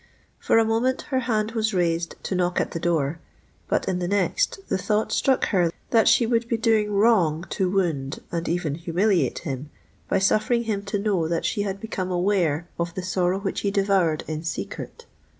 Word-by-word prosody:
For - - +2
a 225 - +5
moment 230 +4 +1
her 260 - +2
hand 220 -3 0
was 220 -2 -1
raised 170 -1 0
to - - -3
knock 180 -1 +1
at - - -1
the 165 - -4
door; 160 -2 0 0.5
but - - 0
in 180 -1 0
the 175 - -2
next 200 0 +1
the - - -1
thought 215 +2 0
struck 265 +4 +2
her 175 -5 +2 0.2
that 225 -2 +4
she 235 - +5
would 230 0 +1
be 230 - +1
doing 220 -2 +2
wrong 195 -7 +3
to 185 -1 0
wound, 165 -8 -1
and 170 -1 -2
even 170 -3 -1
humiliate 175 +4 +1
him, 140 0 -4 0.4
by - - +2
suffering 215 +4 +2
him 215 -3 -2
to 205 +1 -1
know 200 -5 0
that 165 0 -1
she 205 - 0
had 195 -1 -3
become 195 -4 -4
aware 175 -3 +1
of 170 0 -2
the 185 - -4
sorrow 185 0 0
which 195 - -2
he 200 - 0
devoured 195 -6 +1
in 155 0 -3
secret! 320 - -6
190 Hz, 195 wpm, -24 LUFS, 170-215 Hz, 0.5 s, a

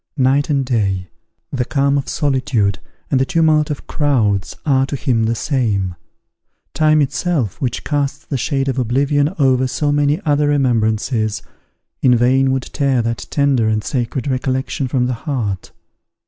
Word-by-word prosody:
Night 135 +2 +2
and 140 -2 +1
day, 100 -7 -1 0.4
the 130 -4 -1
calm 140 +2 +1
of 140 - -1
solitude 130 - 0 0.3
and 130 - +3
the - - +4
tumult 155 0 +2
of 150 - -5
crowds, 105 - 0
are 135 -2 +2
to 140 - -3
him 125 -5 0
the 115 +1 0
same; 110 - -1 0.8
time 155 -1 +3
itself, 140 - -2
which 125 -4 -2
casts 145 -1 -2
the 140 - -4
shade 135 +2 -1
of 135 0 -1
oblivion 140 +5 +1
over 130 -3 +3
so 145 +3 -1
many 145 +2 +2
other 145 -1 +2
remembrances, 115 -4 0 0.6
in 125 -2 +5
vain 130 +3 +3
would 130 -1 -1
tear 135 -3 0
that 115 0 -3
tender 140 -6 +2
and 110 -1 0
sacred 125 -2 -2
recollection 130 +1 -1
from 125 -1 0
the 125 - -1 0.2
heart. 105 -9 -2
130 Hz, 155 wpm, -18 LUFS, 115-145 Hz, 0.8 s, in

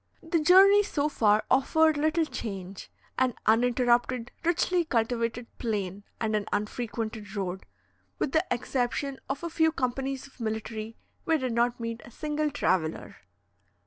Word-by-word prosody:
The 330 0 +1
journey 385 +6 +7
so 300 -8 -1
far 215 -6 +3
offered 315 +4 +4
little 315 +2 +1
change, 195 -8 -6 0.3
an 255 -3 +2
uninterrupted 240 +1 +2
richly 350 +1 +2
cultivated 230 -3 -1
plain 205 -4 -3
and 220 -1 0
an 210 -1 -1
unfrequented 215 -1 -3
road. 190 -2 -4 0.5
With 265 - -1
the 315 +3 +3
exception 250 +2 -1
of 275 +4 -3
a 340 - -2
few 320 0 +3
companies 265 -1 -2
of 275 - -18
military, 220 0 -4 0.3
we 325 -1 +3
did 255 -4 -2
not 240 +1 +1
meet 230 0 -4
a - - -12
single 300 +4 -2
traveller. 180 - -1
245 Hz, 140 wpm, -28 LUFS, 220-300 Hz, 0.5 s, journey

